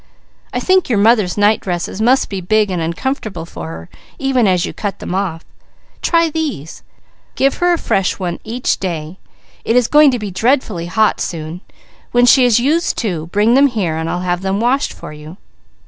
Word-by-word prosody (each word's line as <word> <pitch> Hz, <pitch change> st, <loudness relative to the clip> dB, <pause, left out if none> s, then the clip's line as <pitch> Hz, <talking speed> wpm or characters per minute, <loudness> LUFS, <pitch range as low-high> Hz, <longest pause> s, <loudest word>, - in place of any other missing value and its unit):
I -, -, -2 dB
think 375 Hz, -4 st, +2 dB
your 230 Hz, -, +2 dB
mother's 210 Hz, -3 st, +3 dB
night 205 Hz, +1 st, +3 dB
dresses 180 Hz, +2 st, -4 dB
must 250 Hz, +4 st, +3 dB
be 195 Hz, -2 st, -5 dB
big 210 Hz, +2 st, +1 dB
and 180 Hz, -2 st, -2 dB
uncomfortable 175 Hz, -, -3 dB
for 80 Hz, -, -8 dB
her, 80 Hz, +1 st, -9 dB, 0.3 s
even 265 Hz, -5 st, +1 dB
as 180 Hz, -2 st, +2 dB
you -, -, -6 dB
cut 200 Hz, -3 st, -4 dB
them -, -, -6 dB
off. 185 Hz, -4 st, -3 dB, 0.6 s
Try 335 Hz, -1 st, +2 dB
these. 290 Hz, -, -4 dB, 0.5 s
Give 275 Hz, 0 st, +2 dB
her 355 Hz, 0 st, +2 dB
a -, -, +1 dB
fresh 195 Hz, -, 0 dB
one 175 Hz, -3 st, -4 dB
each 240 Hz, +3 st, -2 dB
day. 170 Hz, -1 st, -5 dB, 0.4 s
It 230 Hz, -, 0 dB
is 250 Hz, -2 st, +4 dB
going 300 Hz, -1 st, +6 dB
to 250 Hz, -, 0 dB
be 210 Hz, -3 st, -5 dB
dreadfully 215 Hz, -4 st, 0 dB
hot 215 Hz, +4 st, +1 dB
soon. 165 Hz, +1 st, -5 dB, 0.5 s
When 245 Hz, 0 st, +5 dB
she 250 Hz, +1 st, +6 dB
has 240 Hz, -2 st, +4 dB
used 310 Hz, +7 st, +1 dB
two, 175 Hz, -9 st, -3 dB
bring 210 Hz, +6 st, +2 dB
them 275 Hz, +2 st, +6 dB
here 200 Hz, -, -2 dB
and 160 Hz, +1 st, -3 dB
I'll 175 Hz, -, -2 dB
have 180 Hz, 0 st, -1 dB
them 190 Hz, +1 st, -1 dB
washed 255 Hz, +5 st, +1 dB
for -, -, -10 dB
you." 150 Hz, +4 st, -11 dB
205 Hz, 195 wpm, -16 LUFS, 175-250 Hz, 0.6 s, going